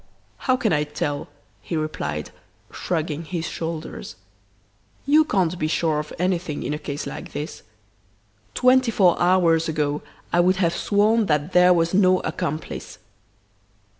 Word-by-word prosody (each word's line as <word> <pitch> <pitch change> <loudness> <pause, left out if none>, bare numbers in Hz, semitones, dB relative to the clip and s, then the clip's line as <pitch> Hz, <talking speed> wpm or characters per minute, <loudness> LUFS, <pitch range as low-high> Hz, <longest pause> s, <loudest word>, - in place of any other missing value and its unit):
"'How 255 -1 +1
can 225 -7 +1
I 150 -1 +2
tell?' 145 -1 -3 0.3
he 165 - -3
replied, 75 - -3 0.4
shrugging 160 -2 -2
his 165 0 -4
shoulders. 160 - -6 0.9
'You 300 +3 +5
can't 180 - 0
be 155 - 0
sure 155 -1 +1
of 150 0 -6
anything 175 -4 -1
in - - -2
a 150 - -3
case 145 -1 -5
like - - -7
this. 150 +2 -5 0.9
Twenty 255 -1 +4
four 190 -6 +4
hours 170 -3 +3
ago 150 -2 -1 0.3
I 175 - +4
would 180 +2 +4
have 170 -2 +1
sworn 215 +1 +2
that 150 +1 0
there 180 0 +6
was 170 -1 +2
no 185 -1 +4
accomplice! 155 0 -4
170 Hz, 140 wpm, -23 LUFS, 155-185 Hz, 0.9 s, there